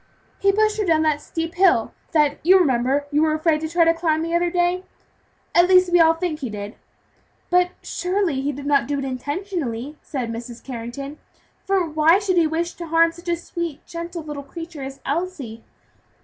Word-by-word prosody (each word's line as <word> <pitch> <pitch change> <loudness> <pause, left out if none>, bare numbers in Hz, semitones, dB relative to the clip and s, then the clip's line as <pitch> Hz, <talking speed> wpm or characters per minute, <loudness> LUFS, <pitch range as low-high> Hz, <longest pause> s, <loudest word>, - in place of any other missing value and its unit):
"He 395 - +4
pushed 430 +1 +1
her - - +2
down 320 -4 +2
that 305 -2 +1
steep 330 +1 -4
hill 355 - +3 0.2
that 300 -3 +2
you 370 +4 +7
remember 270 -3 +2
you 295 +1 +2
were 310 -1 +2
afraid 310 -1 +1
to 315 - -3
try 335 0 +3
to 330 - +5
climb 325 -1 0
the 335 0 -3
other 345 0 +2
day; 355 +1 +1 0.7
at 345 +1 +5
least 365 -1 +5
we 350 - +5
all 325 0 +6
think 325 -3 -3
he 260 -5 -4
did." 205 0 -6 0.8
"But 360 0 +4
surely, 360 -6 -1
he 285 +2 -1
did 285 0 -8
not 285 -1 +2
do 285 0 -1
it 275 - -3
intentionally," 285 - -4
said 250 -5 -4
Mrs. 235 +1 -8
Carrington, 265 +4 -7 0.5
"for 385 -3 +1
why 315 +3 +4
should 390 -3 0
he 330 -2 +4
wish 335 +2 -2
to 340 - -6
harm 330 +1 +4
such 345 +1 -9
a 340 - +2
sweet, 340 -2 -6
gentle 335 0 -6
little 295 -2 -6
creature 330 +2 -9
as 270 0 -7
Elsie?" 280 -8 -3
325 Hz, 195 wpm, -22 LUFS, 280-350 Hz, 0.8 s, you